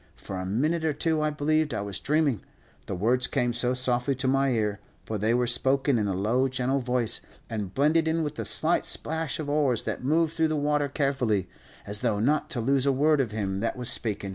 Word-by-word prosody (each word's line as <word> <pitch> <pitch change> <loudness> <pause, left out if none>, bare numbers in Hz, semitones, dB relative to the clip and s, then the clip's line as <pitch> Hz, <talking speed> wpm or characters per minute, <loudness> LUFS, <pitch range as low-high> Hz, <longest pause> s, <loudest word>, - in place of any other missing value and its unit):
For 95 - -7
a 95 - -4
minute 155 - 0
or 160 -2 +1
two 160 +1 0
I 155 - +1
believed 150 +1 0
I - - -2
was 100 -1 -4
dreaming, 145 -6 +1 0.5
the 95 - -3
words 120 +7 +1
came 120 -1 0
so 125 +2 +1
softly 125 +1 0
to 130 +1 -2
my 135 +1 +2
ear, 105 -4 0 0.3
for 110 -1 -3
they 110 +3 +1
were 125 0 +2
spoken 130 +1 +2
in 105 - 0
a 95 - -1
low, 115 +7 +1
gentle 130 +1 -1
voice, 125 -2 0 0.3
and 105 -4 -3
blended 155 - +2
in 160 0 +1
with 150 -1 -3
the - - -5
slight 165 +2 +2
splash 160 -4 -2
of 155 - -5
oars 145 -5 +1
that - - -4
moved 160 +3 +2
through 160 -1 +2
the 155 - -1
water 145 -1 0
carefully, 130 - 0 0.4
as 105 +1 -2
though 115 -3 0
not 150 +6 +1
to 145 -7 -2
lose 135 +3 +1
a - - +5
word 145 +2 +3
of 125 - -2
him 100 -3 -2
that 115 +4 -2
was 125 -1 +4
speakin'. 105 -3 -1
130 Hz, 225 wpm, -27 LUFS, 115-150 Hz, 0.5 s, a